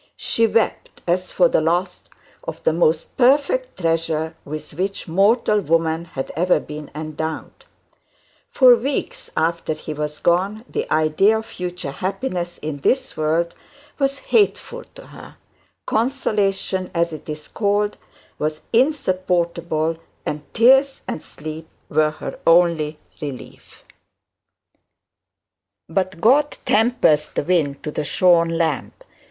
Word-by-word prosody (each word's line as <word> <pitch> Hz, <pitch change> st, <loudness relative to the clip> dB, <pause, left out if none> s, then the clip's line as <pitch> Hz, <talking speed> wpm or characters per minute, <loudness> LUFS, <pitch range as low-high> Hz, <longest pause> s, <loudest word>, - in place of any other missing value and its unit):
She 230 Hz, 0 st, +1 dB
wept 225 Hz, 0 st, -1 dB
as 180 Hz, +1 st, 0 dB
for 180 Hz, -, +4 dB
the 165 Hz, -, +2 dB
loss 175 Hz, +3 st, -1 dB, 0.4 s
of 160 Hz, 0 st, -7 dB
the -, -, +3 dB
most 160 Hz, -1 st, +1 dB
perfect 285 Hz, -, +2 dB
treasure 165 Hz, -1 st, 0 dB
with 155 Hz, +1 st, -7 dB
which 190 Hz, +6 st, -3 dB
mortal 210 Hz, +5 st, +3 dB
woman 165 Hz, -1 st, 0 dB
had 135 Hz, -5 st, -5 dB
ever 180 Hz, +3 st, +3 dB
been 150 Hz, 0 st, -8 dB
endowed; 155 Hz, +1 st, -5 dB, 0.8 s
for 255 Hz, -2 st, +7 dB
weeks 265 Hz, +4 st, -3 dB
after 165 Hz, 0 st, 0 dB
he 155 Hz, -, -7 dB
was 150 Hz, 0 st, -4 dB
gone 195 Hz, +8 st, +1 dB
the -, -, -4 dB
idea 155 Hz, +8 st, +3 dB
of 220 Hz, -, -5 dB
future 180 Hz, -7 st, -5 dB
happiness 180 Hz, -, -3 dB
in 150 Hz, -2 st, -4 dB
this 260 Hz, -, 0 dB
world 160 Hz, +2 st, 0 dB, 0.5 s
was 275 Hz, 0 st, +1 dB, 0.2 s
hateful 465 Hz, +3 st, +2 dB
to -, -, -12 dB
her; -, -, -13 dB, 0.5 s
consolation, 205 Hz, -6 st, 0 dB
as 170 Hz, -1 st, +1 dB
it 155 Hz, -, -9 dB
is 150 Hz, 0 st, -6 dB
called, 205 Hz, 0 st, 0 dB, 0.4 s
was 155 Hz, 0 st, -2 dB
insupportable, 175 Hz, -, +1 dB, 0.3 s
and 150 Hz, 0 st, -5 dB
tears 265 Hz, +4 st, +5 dB
and -, -, -4 dB
sleep 155 Hz, +1 st, -8 dB, 0.2 s
were 155 Hz, 0 st, +3 dB
her 155 Hz, -, -7 dB
only 165 Hz, -3 st, +4 dB, 0.2 s
relief. 140 Hz, -4 st, -9 dB, 2.0 s
But 185 Hz, +1 st, -2 dB
God 275 Hz, -, +3 dB
tempers 210 Hz, -10 st, +3 dB
the -, -, -2 dB
wind 150 Hz, -5 st, 0 dB
to 150 Hz, -, -3 dB
the -, -, -2 dB
shorn 170 Hz, +1 st, +3 dB
lamb. 165 Hz, -1 st, -1 dB
170 Hz, 125 wpm, -21 LUFS, 155-210 Hz, 2.0 s, for